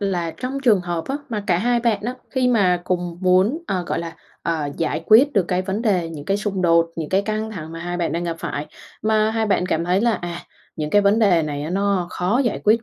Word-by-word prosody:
là 180 -4 -1
trong 255 +11 -5
trường 225 -7 +4
hợp 175 -2 -3
á 275 - -1
mà 210 -4 -3
cả 175 -2 +2
hai 240 +3 +1
bạn 225 -4 +1
á 245 +4 -3 0.2
khi 255 -2 +1
mà 185 -7 +3
cùng 175 -2 -2
muốn, 190 - +3
ờ, 180 -2 -1
gọi - - -1
là, 165 -1 -6 0.3
ờ, 160 -3 -1
giải 160 -1 -1
quyết 255 +7 +6
được 200 - +3
cái 180 0 0
vấn 195 +4 -3
đề 185 -7 +1
những 150 -3 -8
cái 195 +2 +1
xung 200 -3 -2
đột, 170 -1 +3
những 160 -2 -4
cái 195 +1 +2
căng 215 +1 -3
thẳng 165 -6 -7
mà 165 - -7
hai 175 +1 -3
bạn 170 -2 -1
đang 170 +1 -2
gặp 165 -1 -3
phải, 145 -1 -4 0.4
mà 215 0 +2
hai 220 -1 0
bạn 190 -3 +1
cảm 165 -2 0
thấy 180 +2 +2
là, 235 +1 +3
à, 175 -2 -5 0.4
những 150 -1 -3
cái 205 +3 +4
vấn 200 +2 +3
đề 190 -7 +4
này 145 -1 -3
á 155 - -4
nó 195 -1 0
khó 185 +7 0
giải 240 - -1
quyết 225 +2 +4
185 Hz, 255 wpm, -21 LUFS, 170-215 Hz, 0.4 s, quyết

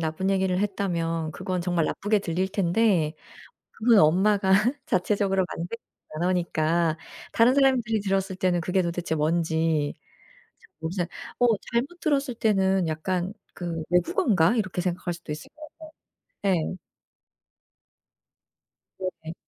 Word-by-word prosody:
나쁜 165 +4 -1
얘기를 190 -1 +1
했다면 170 -5 -1
그건 185 +2 -3
정말 175 -2 0
나쁘게 205 +5 0
들릴 185 0 -1
텐데 185 -4 +2 0.6
그건 225 -1 +3
엄마가 190 +5 +3 0.3
자체적으로 195 0 +1
만든 175 +7 -5 0.4
단어니까 170 -1 0 0.3
다른 235 +3 +4
사람들이 250 -6 +3
들었을 195 -1 -1
때는 180 -2 +1
그게 185 +3 +1
도대체 170 -1 -2
뭔지 160 -1 +1 0.7
잘 - - -21
모르잖 175 +2 -2 0.3
어 245 - +4 0.3
잘못 275 +9 -1
들었을 280 -4 0
때는 195 -5 +2
약간 180 +4 -2 0.2
그 170 -2 -4
'외국어인가?' 180 +2 +3
이렇게 190 -4 -1
생각할 175 0 -2
수도 170 -2 -7
있을 150 - -8
거 310 0 -11 0.7
같아요. 195 -3 +3 0.2
예. 185 - -10 2.2
네네. 170 -4 -6
185 Hz, 275 characters per minute, -26 LUFS, 165-200 Hz, 2.2 s, 다른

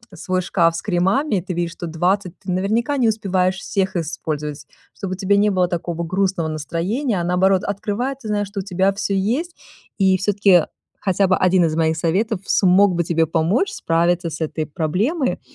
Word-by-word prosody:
свой 185 +2 -1
шкаф 170 -2 +2
с 170 - -5
кремами, 200 - +1
ты 185 +1 -5
видишь, 170 -1 -1
что 170 0 -7
20 180 +3 -1
ты, 190 - -6
наверняка, 220 +10 0
не 235 -3 +3
успеваешь 190 -3 0
всех 190 -1 -2
использовать, 150 -3 -4 0.3
чтобы 195 -3 -5
у - - -5
тебя 200 +1 +2
не 210 +1 +3
было 185 -2 +2
такого 170 -1 -3
грустного 185 -1 0
настроения, 175 - -2
а, - - -2
наоборот, 185 +2 +2
открывая, 205 +6 -2
ты 265 -4 -11
знаешь, 205 -1 -1
что 200 0 -6
у - - -3
тебя 190 +1 +1
всё 200 0 -2
есть, 250 - -1 0.4
и 190 -2 +3
всё-таки 195 -4 +3 0.3
хотя 195 0 +1
бы 185 - +3
1 185 -1 +3
из 155 -1 -1
моих 160 0 +1
советов 190 +6 0
смог 190 +1 +4
бы 170 0 0
тебе 165 0 +1
помочь 170 - +1
справиться 170 - 0
с 160 - -7
этой 155 -1 -3
проблемой. 195 - -1
185 Hz, 185 wpm, -20 LUFS, 170-205 Hz, 0.4 s, смог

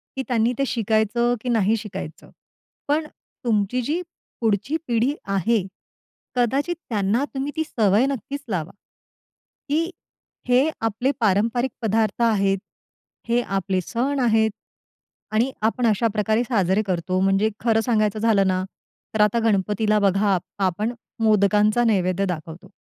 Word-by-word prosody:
की 265 - -2
त्यांनी 235 -1 +2
ते 275 - +2
शिकायचं 225 +1 +1
की 250 - -4
नाही 220 -2 +3
शिकायचं. 195 -7 -8 0.6
पण 300 +2 +1 0.4
तुमची 220 +2 +1
जी 305 +8 -1 0.4
पुढची 225 +7 +1
पिढी 240 +3 +1 0.2
आहे, 215 +4 +2 0.7
कदाचित 270 +8 +1
त्यांना 215 +3 +1
तुम्ही 275 +1 -3
ती 315 - 0
सवय 220 -5 +2
नक्कीच 275 +1 -4
लावा 175 -3 -2 1.0
की 325 +4 +1 0.6
हे 255 +5 +4
आपले 225 +4 0
पारंपरिक 230 +4 +1
पदार्थ 220 -1 0
आहेत, 200 -4 +2 0.7
हे 240 +1 +3
आपले 195 -3 -1
सण 265 +9 -1
आहेत. 220 -3 +3 0.8
आणि 230 +5 +1
आपण 225 +3 +1
अशा 220 +1 +2
प्रकारे 215 +2 +1
साजरे 205 -5 +1
करतो. 185 0 -1
म्हणजे 195 +3 +3
खरं 225 -1 +2
सांगायचं 215 -3 +1
झालं 210 -3 +3
ना, 185 0 +1 0.5
तर 215 - +3
आता 210 +2 +3
गणपतीला 210 +1 +2
बघा, 200 0 +2
आ - - +2 0.3
आपण 210 +6 -2 0.3
मोदकांचा 210 +2 +3
नैवेद्य 195 -4 +1
दाखवतो. 165 -2 -6
220 Hz, 130 wpm, -23 LUFS, 200-240 Hz, 1.0 s, हे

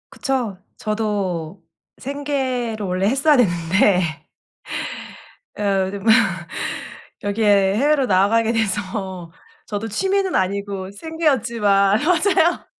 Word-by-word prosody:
그쵸. 250 -8 -2 0.2
저도 200 -5 -2 0.8
생계로 240 -6 -2
원래 185 +2 0
했어야 275 +5 +3
되는데. 175 -4 +2 1.3
어 195 -2 +1
더 200 - -5
뭐 220 +3 +2 1.1
여기에 205 -2 +2
해외로 285 +2 +2
나가게 220 +3 +3
돼서 190 -4 -3 0.4
저도 210 +1 -4
취미는 385 - 0
아니고 195 0 -2
생계였지만 230 -8 +1
맞아요. 350 0 +2
205 Hz, 210 characters per minute, -21 LUFS, 190-250 Hz, 1.3 s, 했어야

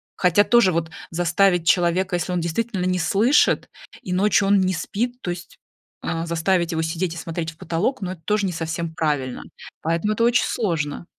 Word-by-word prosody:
Хотя 180 +3 +4
тоже 235 -4 +4
вот, 160 -1 -1 0.2
заставить 175 +1 +2
человека, 180 +1 +2
если 175 +1 -2
он 180 - 0
действительно 185 +3 -2
не 185 0 +1
слышит 215 - +3 0.3
и 180 - -4
ночью 195 +1 +3
он 200 0 +4
не 185 0 +1
спит, 240 +8 -3
то - - -4
есть, 175 0 -7 0.5
э, 165 0 -2
заставить 170 +1 0
его 160 0 -1
сидеть 165 +2 -2
и - - -8
смотреть 165 0 -4
в 155 - -22
потолок, 185 +11 -2
ну, 185 -1 -3
это 170 -3 -9
тоже 210 -2 +1
не - - -2
совсем 165 0 -4
правильно. 145 -5 -1 0.4
Поэтому 165 +6 0
это 230 +2 0
очень 240 +1 +4
сложно. 165 -8 -2
175 Hz, 190 wpm, -22 LUFS, 165-195 Hz, 0.5 s, Хотя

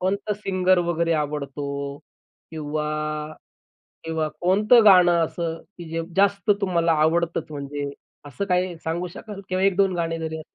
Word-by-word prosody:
कोणता 200 +3 -1
सिंगर 185 -2 +1
वगैरे 170 0 +1
आवडतो? 145 -2 -3 0.8
किंवा 150 -1 -3 1.2
किंवा 160 -1 -1
कोणतं 210 +6 +5
गाणं 180 -4 +7
अ, - - +2
सं 165 -2 -4 0.2
की 175 - -7
जे 165 0 -2
जास्त 200 +1 +2
तुम्हाला 170 -4 +2
आवडतंच 170 +2 +1
म्हणजे 145 -1 -5 0.4
असं 145 +8 -4
काही 180 -2 0
सांगू 170 +2 -2
शकाल 195 +3 -9
किंवा 185 0 -1
1-2 195 -1 +3
गाणे 165 -1 -1
जरी? 160 -1 -4
170 Hz, 135 wpm, -23 LUFS, 160-190 Hz, 1.2 s, गाणं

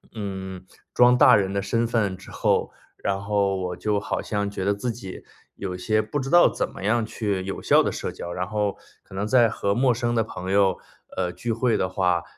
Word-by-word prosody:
嗯， 95 -3 -6 0.3
装 125 0 +5
大 130 -3 +7
人 100 -1 +1
的 100 - 0
身 115 +2 0
份 105 -5 0
之 - - -14
后， - - +1 0.3
然 95 -1 -2
后 100 -1 +1
我 90 -1 -3
就 105 -1 0
好 - - -3
像 100 -1 -2
觉 95 -2 -5
得 100 +1 +2
自 115 +4 -3
己， 100 -5 -9 0.3
有 95 -2 -5
些 110 +4 +1
不 145 +7 -3
知 135 0 -4
道 175 +1 +7
怎 - - -3
么 95 - -10
样 115 +2 +2
去 100 -4 -2
有 95 - -5
效 - - +5
地 - - -1
社 - - -4
交， 85 - -7
然 90 0 -3
后 105 -1 -1 0.3
可 95 - -14
能 100 +2 -1
在 120 -2 +5
和 100 -2 -1
陌 125 +1 +3
生 120 0 -1
的 115 - +3
朋 95 -3 -6
友， 100 -2 +3 0.4
呃， 90 -1 0
聚 115 +6 -4
会 115 +1 +1
的 95 - -1
话， 90 -2 +1
100 Hz, 240 characters per minute, -24 LUFS, 95-115 Hz, 0.4 s, 大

